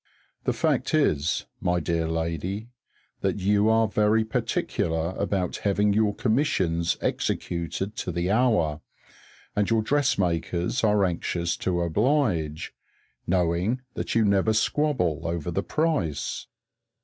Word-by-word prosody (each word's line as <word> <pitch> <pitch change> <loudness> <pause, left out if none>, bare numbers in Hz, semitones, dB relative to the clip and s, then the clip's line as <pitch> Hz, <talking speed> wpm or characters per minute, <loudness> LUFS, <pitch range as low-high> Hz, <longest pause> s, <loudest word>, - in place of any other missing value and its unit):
The - - +2
fact - - +1
is, 75 +3 +1
my 90 0 +1
dear 85 0 -1
lady, 85 +7 -3 0.5
that - - 0
you 100 +2 +2
are 110 0 +4
very 105 +1 +2
particular 80 -6 -1
about 95 -1 -1
having 100 0 +1
your 105 -1 +2
commissions 95 - +1
executed 90 +4 -2
to 90 - -3
the 85 +2 -1
hour, 100 -11 +2 0.7
and 105 -1 +1
your 115 -1 +2
dressmakers 100 - 0
are 105 -2 +4
anxious 85 -1 -1
to 90 -2 -1
oblige, 85 - 0 0.5
knowing 90 +7 +1
that - - -3
you 115 -1 +4
never 100 +2 +3
squabble 110 - +1
over 85 0 -2
the - - 0
price. 150 - -1
95 Hz, 120 wpm, -26 LUFS, 85-110 Hz, 0.7 s, are